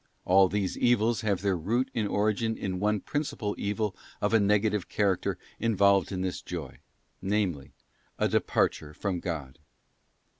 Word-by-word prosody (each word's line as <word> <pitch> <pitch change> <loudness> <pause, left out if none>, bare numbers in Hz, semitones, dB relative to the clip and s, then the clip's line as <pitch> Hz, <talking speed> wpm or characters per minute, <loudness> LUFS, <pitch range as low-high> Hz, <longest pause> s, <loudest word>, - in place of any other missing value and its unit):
All 95 +1 +5
these 100 -1 -1
evils 120 -1 +3
have 100 -4 0
their 100 -2 +2
root 115 +10 0
and 110 -3 0
origin 110 +2 0
in 95 -2 -3
one 105 0 +1
principal 140 -8 -2
evil 105 0 -1 0.2
of 105 +2 0
a 115 - +6
negative 105 -1 +2
character 100 -3 0 0.2
involved 100 -4 +3
in 95 -1 -2
this 95 -1 -2
joy, 80 -8 -7 0.4
namely, 95 -8 -1 0.5
a - - +2
departure 75 -1 0
from 95 -1 -2
God. 80 -6 -5
100 Hz, 145 wpm, -28 LUFS, 90-105 Hz, 0.5 s, a